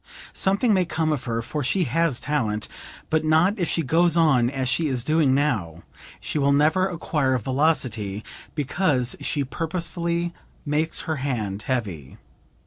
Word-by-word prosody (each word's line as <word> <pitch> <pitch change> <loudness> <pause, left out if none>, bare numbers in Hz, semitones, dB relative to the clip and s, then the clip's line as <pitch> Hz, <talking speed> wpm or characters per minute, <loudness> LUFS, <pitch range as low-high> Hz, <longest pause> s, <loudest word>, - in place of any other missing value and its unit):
Something 200 +4 +2
may 185 -2 +3
come 160 -2 -1
of 145 - -4
her 115 -1 -2
for 150 +4 -3
she 180 +9 +1
has 165 -1 0
talent, 110 -8 -1 0.4
but 160 0 +2
not 160 +7 +3
if 175 - 0
she 165 - 0
goes 165 +4 +3
on 135 -8 +4
as 130 -1 -2
she 155 +5 +1
is 130 -4 -1
doing 155 -3 +3
now; 105 - -1 0.4
she 150 - -3
will 140 0 +3
never 155 +6 +3
acquire 150 -6 0
velocity 120 -6 0 0.3
because 140 -4 0
she 145 - -1
purposely 170 +3 -2 0.3
makes 155 +2 +1
her 160 -3 -3
hand 110 -8 -3
heavy. 100 - -3
150 Hz, 150 wpm, -24 LUFS, 125-165 Hz, 0.4 s, on